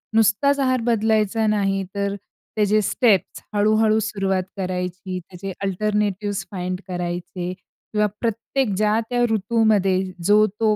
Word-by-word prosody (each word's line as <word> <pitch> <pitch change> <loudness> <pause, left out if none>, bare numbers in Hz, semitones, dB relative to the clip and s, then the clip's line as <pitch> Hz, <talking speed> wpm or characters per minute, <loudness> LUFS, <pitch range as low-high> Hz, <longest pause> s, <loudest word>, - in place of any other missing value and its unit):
नुसताच 225 +6 +3
आहार 255 -3 +2
बदलायचा 220 -1 +1
नाही 195 -2 +1
तर 200 0 -1 0.4
त्याचे 215 0 +3
स्टेप्स 200 -3 +1
हळू-हळू 215 +1 +3
सुरुवात 195 -3 -1
करायची, 185 0 -3
त्याचे 180 +2 -8
अल्टरनेटिव्हज 205 0 -1
फाइंड 180 -1 -3
करायचे 175 0 -4
किंवा 210 +3 -4 0.2
प्रत्येक 230 +3 -1
ज्या 215 +1 +2
त्या 245 -1 0
ऋतूमध्ये 215 -2 +2 0.3
जो 210 +2 +6
तो 215 -2 +3
210 Hz, 115 wpm, -22 LUFS, 190-220 Hz, 0.4 s, जो